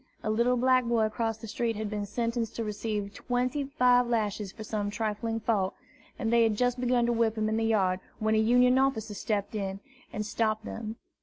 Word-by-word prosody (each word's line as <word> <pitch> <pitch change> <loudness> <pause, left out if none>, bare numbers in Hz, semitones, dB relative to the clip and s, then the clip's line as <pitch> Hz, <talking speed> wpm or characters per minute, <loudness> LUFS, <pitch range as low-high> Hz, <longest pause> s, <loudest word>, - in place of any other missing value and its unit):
A 215 - 0
little 240 +3 +2
black 255 +1 +4
boy 235 -2 +2
across 225 0 -1
the 225 - -9
street 230 +1 -1
had 215 0 -3
been 205 -1 -3
sentenced 230 +1 -2
to 230 - -2
receive 210 -1 -3
twenty 250 +5 -1
five 250 -3 +3
lashes 210 -4 -1
for 220 - -9
some 210 -1 -2
trifling 225 +1 -2
fault, 205 -4 0 0.4
and 230 -2 -1
they 235 - +5
had 220 -2 +2
just 245 +1 +1
begun 245 -1 +2
to 240 - +1
whip 230 -1 +1
him 215 0 +1
in 220 0 0
the 225 - 0
yard, 190 -5 +2 0.2
when 220 0 +1
a 220 - +4
Union 245 +3 +4
officer 240 -6 0
stepped 205 +1 -2
up 195 -2 -2 0.4
and 210 0 -3
stopped 215 0 -1
them. 220 -1 -5
225 Hz, 210 wpm, -29 LUFS, 215-240 Hz, 0.4 s, they